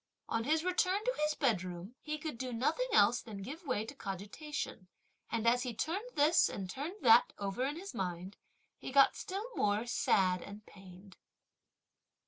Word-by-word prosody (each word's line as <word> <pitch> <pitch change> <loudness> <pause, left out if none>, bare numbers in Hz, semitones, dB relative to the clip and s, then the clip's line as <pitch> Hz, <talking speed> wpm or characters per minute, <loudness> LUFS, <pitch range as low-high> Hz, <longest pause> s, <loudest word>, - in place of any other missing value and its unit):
On 230 0 -1
his 315 +3 +2
return 365 +2 +2
to - - +2
his 300 0 +1
bedroom, 185 - -1
he 305 0 -3
could 305 -6 -6
do 255 -1 -3
nothing 300 - 0
else 225 - +5
than 205 -4 -8
give 290 - -7
way 220 -5 0
to 230 - -8
cogitation, 205 - -6 0.4
and, 230 0 -1
as 245 +1 +4
he 245 -3 -4
turned 385 - -2
this 305 +2 +5
and 195 -2 -5
turned 285 - -5
that 235 0 +7
over 200 +4 -2
in 280 +3 -1
his 385 +4 -8
mind, 180 +1 -4 0.4
he - - -6
got 275 0 +6
still 390 +3 -4
more 210 +2 +1
sad 185 -6 +2
and 205 +1 -10
pained. 190 0 -14
240 Hz, 170 wpm, -33 LUFS, 200-300 Hz, 0.4 s, that